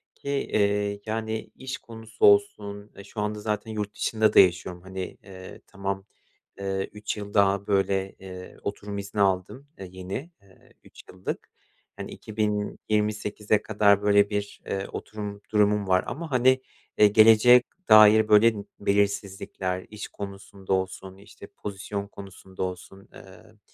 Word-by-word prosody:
ki, 140 Hz, -, -8 dB
eee, 100 Hz, -6 st, 0 dB
yani, 110 Hz, 0 st, -3 dB
iş 130 Hz, +1 st, -6 dB
konusu 115 Hz, -, -3 dB
olsun, 105 Hz, -, +2 dB
e, 100 Hz, -, -11 dB
şu 105 Hz, +1 st, -6 dB
anda 105 Hz, 0 st, -2 dB
zaten 105 Hz, +1 st, -3 dB
yurt 105 Hz, -1 st, -4 dB
dışında 110 Hz, -1 st, +1 dB
da -, -, +7 dB
yaşıyorum, 90 Hz, -1 st, +3 dB
hani, 95 Hz, 0 st, -7 dB
eee, 95 Hz, -1 st, -11 dB
tamam, 100 Hz, -1 st, -4 dB, 0.5 s
eee, 95 Hz, 0 st, -2 dB
3 105 Hz, +1 st, -4 dB
yıl 100 Hz, -1 st, -7 dB
daha, 100 Hz, -1 st, +2 dB
böyle, 95 Hz, -1 st, +1 dB
eee, 90 Hz, -1 st, -10 dB
oturum 100 Hz, 0 st, -5 dB
izni 100 Hz, +1 st, -3 dB
aldım, 95 Hz, +8 st, 0 dB
eee, 95 Hz, -, -7 dB
yeni, 95 Hz, -, -6 dB
eee, 95 Hz, -2 st, -23 dB
3 -, -, -16 dB
yıllık. 95 Hz, 0 st, -6 dB, 0.5 s
Hani, -, -, -7 dB
2028'e 105 Hz, 0 st, -1 dB
kadar 100 Hz, -2 st, +3 dB
böyle 100 Hz, 0 st, +4 dB
bir, 100 Hz, -1 st, -4 dB
eee, 95 Hz, 0 st, -3 dB
oturum 105 Hz, -1 st, -7 dB
durumum 105 Hz, -1 st, +2 dB
var 95 Hz, 0 st, +3 dB
ama, 160 Hz, +3 st, -6 dB
hani, 130 Hz, +1 st, +4 dB, 0.4 s
eee, 105 Hz, -, +7 dB
geleceğe 110 Hz, +4 st, +7 dB, 0.3 s
dair 110 Hz, 0 st, +8 dB
böyle 110 Hz, +2 st, +6 dB, 0.3 s
belirsizlikler, 100 Hz, -2 st, -1 dB
iş 105 Hz, -1 st, -7 dB
konusunda 100 Hz, -1 st, -6 dB
olsun, 95 Hz, 0 st, -3 dB
işte, 100 Hz, -, -14 dB
pozisyon 100 Hz, 0 st, -6 dB
konusunda 95 Hz, -2 st, -9 dB
olsun, 95 Hz, +1 st, -7 dB
ııı, -, -, -16 dB
100 Hz, 140 wpm, -26 LUFS, 95-110 Hz, 0.5 s, dair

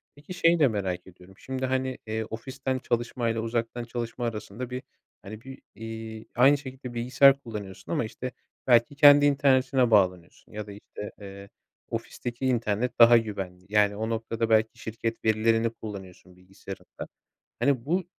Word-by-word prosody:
Peki, 150 Hz, +6 st, -10 dB
şeyi 170 Hz, -1 st, +3 dB
de 145 Hz, -, +6 dB
merak 95 Hz, -5 st, -3 dB
ediyorum. 90 Hz, +1 st, -16 dB
Şimdi, 130 Hz, 0 st, -4 dB
hani, 130 Hz, 0 st, -1 dB
eee, 110 Hz, 0 st, -2 dB
ofisten 130 Hz, +3 st, -4 dB
çalışmayla 120 Hz, -1 st, -1 dB
uzaktan 115 Hz, +1 st, -2 dB
çalışma 120 Hz, 0 st, -4 dB
arasında 110 Hz, +2 st, -5 dB
bir, 125 Hz, +1 st, -5 dB, 0.4 s
hani, 105 Hz, +2 st, -9 dB
bir, 135 Hz, +2 st, -11 dB
eee, 110 Hz, 0 st, -7 dB
aynı 135 Hz, +4 st, +6 dB
şekilde 130 Hz, -2 st, -9 dB
bilgisayar 130 Hz, +3 st, +5 dB
kullanıyorsun 105 Hz, -7 st, -8 dB
ama, 150 Hz, -9 st, 0 dB
işte, 125 Hz, +3 st, -6 dB, 0.4 s
belki 120 Hz, +3 st, +4 dB
kendi 145 Hz, 0 st, +8 dB
internetine 135 Hz, -3 st, +3 dB
bağlanıyorsun 90 Hz, -5 st, +1 dB
ya 105 Hz, -1 st, -6 dB
da, -, -, -8 dB
işte, 105 Hz, 0 st, -9 dB
eee, 100 Hz, 0 st, -10 dB, 0.4 s
ofisteki 120 Hz, +2 st, -5 dB
internet 120 Hz, -1 st, 0 dB
daha 120 Hz, 0 st, +9 dB
güvenli. 95 Hz, -5 st, -4 dB
Yani, 105 Hz, -1 st, +3 dB
o 110 Hz, +2 st, -3 dB
noktada, 115 Hz, 0 st, -2 dB
belki 110 Hz, 0 st, +2 dB
şirket 115 Hz, +1 st, -4 dB
verilerini 115 Hz, +1 st, +3 dB
kullanıyorsun 95 Hz, -5 st, -10 dB
bilgisayarından. 95 Hz, +1 st, -10 dB, 0.5 s
Hani, 135 Hz, -4 st, +2 dB
bu, 180 Hz, +5 st, 0 dB
115 Hz, 150 wpm, -27 LUFS, 105-130 Hz, 0.5 s, daha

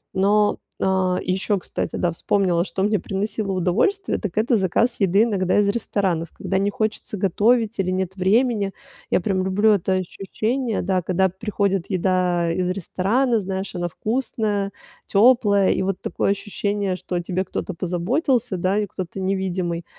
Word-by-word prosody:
Но, 205 Hz, +2 st, +3 dB, 0.2 s
а, 190 Hz, -1 st, +1 dB
ещё, 190 Hz, +3 st, 0 dB
кстати, -, -, -4 dB
да, 175 Hz, -, +1 dB
вспомнила, 175 Hz, 0 st, +1 dB
что 190 Hz, -, -4 dB
мне 210 Hz, 0 st, +2 dB
приносило 200 Hz, +1 st, -3 dB
удовольствие, 190 Hz, -, +1 dB
так 210 Hz, -2 st, -5 dB
это 230 Hz, +2 st, +3 dB
заказ 215 Hz, +6 st, +1 dB
еды 195 Hz, +2 st, +4 dB
иногда 195 Hz, -5 st, +1 dB
из 205 Hz, -1 st, +3 dB
ресторанов, 195 Hz, -6 st, -1 dB
когда 190 Hz, -, -1 dB
не 200 Hz, +1 st, +1 dB
хочется 215 Hz, 0 st, -3 dB
готовить 215 Hz, +4 st, +2 dB
или 185 Hz, -1 st, +1 dB
нет 190 Hz, 0 st, -2 dB
времени. 200 Hz, +1 st, +2 dB, 0.4 s
Я -, -, +3 dB
прям 185 Hz, -1 st, 0 dB
люблю 205 Hz, +3 st, +3 dB
это 190 Hz, -2 st, +1 dB
ощущение, 215 Hz, +6 st, -2 dB
да, 185 Hz, 0 st, 0 dB
когда 190 Hz, +2 st, +2 dB
приходит 195 Hz, -1 st, -2 dB
еда 180 Hz, -2 st, +1 dB
из 180 Hz, +1 st, -1 dB
ресторана, 215 Hz, +7 st, +1 dB
знаешь, 190 Hz, 0 st, -4 dB
она 175 Hz, -1 st, -1 dB
вкусная, 215 Hz, -1 st, -2 dB, 0.4 s
тёплая. 205 Hz, -3 st, +4 dB
И -, -, 0 dB
вот 190 Hz, -1 st, -2 dB
такое -, -, 0 dB
ощущение, 200 Hz, -1 st, -2 dB
что 180 Hz, -, -6 dB
о 175 Hz, -, 0 dB
тебе 185 Hz, +2 st, -2 dB
кто-то 190 Hz, -, -4 dB
позаботился, 195 Hz, -, 0 dB
да, 185 Hz, +4 st, +1 dB
и 210 Hz, -, -1 dB
кто-то 185 Hz, +1 st, -6 dB
невидимый. 185 Hz, -3 st, -2 dB
195 Hz, 155 wpm, -22 LUFS, 185-210 Hz, 0.4 s, еды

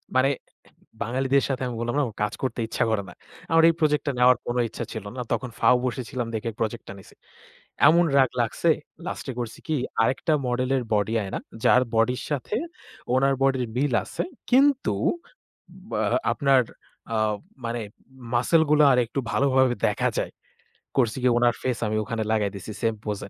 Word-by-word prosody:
মানে 130 Hz, +1 st, +4 dB, 0.7 s
বাঙালিদের 130 Hz, +4 st, +1 dB
সাথে 135 Hz, 0 st, -2 dB
আমি 125 Hz, -, -4 dB
বললাম 120 Hz, 0 st, -2 dB
না 145 Hz, -, +3 dB
আমার 110 Hz, -, -9 dB
কাজ 105 Hz, -, -3 dB
করতে 125 Hz, -2 st, -2 dB
ইচ্ছা -, -, 0 dB
করে 110 Hz, -2 st, +1 dB
না। 90 Hz, -, -11 dB, 0.4 s
আমার 165 Hz, 0 st, +5 dB
এই 165 Hz, -, +3 dB
প্রজেক্টটা 150 Hz, -2 st, +1 dB
নেওয়ার 125 Hz, 0 st, +6 dB
কোনো 120 Hz, +1 st, -1 dB
ইচ্ছা -, -, -5 dB
ছিল 110 Hz, -3 st, -6 dB
না। 125 Hz, -, -4 dB
তখন 125 Hz, -, -2 dB
ফাও 125 Hz, +2 st, +5 dB
বসেছিলাম 125 Hz, -1 st, -3 dB
দেখে 110 Hz, +1 st, -2 dB
প্রজেক্টটা 110 Hz, -2 st, -3 dB
নিছি। 95 Hz, -, -16 dB, 0.7 s
এমন 170 Hz, +2 st, +5 dB
রাগ 130 Hz, -3 st, +5 dB
লাগছে, 120 Hz, +8 st, 0 dB, 0.4 s
লাস্টে 130 Hz, -, -4 dB
করছি 120 Hz, -2 st, -5 dB
কি 155 Hz, -, +1 dB, 0.3 s
আরেকটা 130 Hz, +7 st, +1 dB
মডেলের 125 Hz, +1 st, 0 dB
বডি 105 Hz, +2 st, +1 dB
আয়না। 95 Hz, -, -4 dB, 0.3 s
যার 125 Hz, -, +6 dB
বডির 125 Hz, +3 st, +2 dB
সাথে 145 Hz, -, -2 dB, 0.6 s
ওনার 135 Hz, +1 st, +3 dB
বডির 130 Hz, -2 st, +2 dB
মিল 140 Hz, 0 st, +1 dB
আছে। -, -, -4 dB, 0.3 s
কিন্তু 275 Hz, +1 st, +4 dB, 0.9 s
ব্য -, -, -13 dB, 0.4 s
আপনার 135 Hz, -2 st, +4 dB, 0.5 s
আ -, -, +1 dB, 0.5 s
মানে 115 Hz, +1 st, -2 dB, 0.5 s
মাসল 160 Hz, +7 st, +4 dB
গুলো 150 Hz, 0 st, +5 dB
আরেকটু 125 Hz, +1 st, +1 dB
ভালোভাবে 130 Hz, -2 st, +3 dB
দেখা -, -, 0 dB
যায়। -, -, -2 dB, 0.7 s
করছি 120 Hz, -2 st, +2 dB
কি -, -, +4 dB
ওনার 120 Hz, 0 st, +4 dB
ফেস 125 Hz, -2 st, -1 dB
আমি 110 Hz, -, -1 dB
ওখানে 115 Hz, 0 st, -3 dB
লাগায় 105 Hz, -3 st, +1 dB
দিছি 100 Hz, +2 st, -7 dB
সেম 115 Hz, -1 st, +1 dB
পোজ 105 Hz, -2 st, -3 dB
এ। -, -, -19 dB
125 Hz, 165 wpm, -25 LUFS, 115-135 Hz, 0.9 s, নেওয়ার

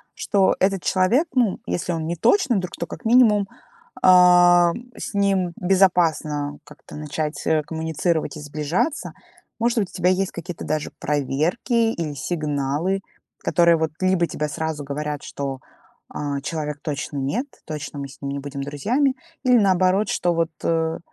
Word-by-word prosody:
Что 195 Hz, -2 st, +2 dB
этот 190 Hz, -1 st, +2 dB
человек, 205 Hz, -, +2 dB
ну, 235 Hz, -7 st, +2 dB
если 175 Hz, -, -2 dB
он 160 Hz, -1 st, -3 dB
не 170 Hz, -, -2 dB
точно 255 Hz, -, +3 dB
друг, 180 Hz, -1 st, -5 dB
то, 170 Hz, -, -3 dB
как -, -, -9 dB
минимум, 220 Hz, -4 st, +5 dB, 0.5 s
а, 175 Hz, -1 st, +7 dB, 0.3 s
с -, -, -6 dB
ним 195 Hz, -3 st, +1 dB
безопасно 165 Hz, -6 st, +2 dB
как-то 150 Hz, 0 st, -14 dB
начать, 150 Hz, +1 st, -4 dB
э, 155 Hz, -1 st, +2 dB
коммуницировать 160 Hz, 0 st, -2 dB
и -, -, -8 dB
сближаться. 150 Hz, -, -2 dB, 0.5 s
Может 235 Hz, 0 st, +1 dB
быть, 195 Hz, -, -1 dB
у -, -, -19 dB
тебя 180 Hz, 0 st, +2 dB
есть 190 Hz, +1 st, +1 dB
какие-то 170 Hz, 0 st, -7 dB
даже 155 Hz, -1 st, -2 dB
проверки 165 Hz, -, 0 dB
или 160 Hz, -3 st, -4 dB
сигналы, 150 Hz, +4 st, -1 dB, 0.4 s
которые 170 Hz, -1 st, +4 dB
вот 160 Hz, 0 st, -1 dB
либо 185 Hz, -2 st, +3 dB
тебе 150 Hz, -, -3 dB
сразу 160 Hz, -1 st, -3 dB
говорят, 150 Hz, +1 st, -4 dB
что, 135 Hz, -2 st, -5 dB, 0.5 s
а, 140 Hz, -1 st, -3 dB
человек 150 Hz, -1 st, -4 dB
точно 145 Hz, -1 st, -4 dB
нет, 165 Hz, -, -1 dB, 0.2 s
точно 150 Hz, -1 st, -6 dB
мы 140 Hz, -, -4 dB
с 135 Hz, -, -16 dB
ним 140 Hz, -1 st, -3 dB
не 140 Hz, -, -3 dB
будем 140 Hz, 0 st, -6 dB
друзьями. 240 Hz, -, 0 dB, 0.3 s
Или 250 Hz, -1 st, +5 dB
наоборот, 190 Hz, +1 st, +3 dB
что 175 Hz, -1 st, +1 dB
вот, 165 Hz, -1 st, 0 dB
э, 160 Hz, -1 st, 0 dB
165 Hz, 155 wpm, -22 LUFS, 150-190 Hz, 0.5 s, а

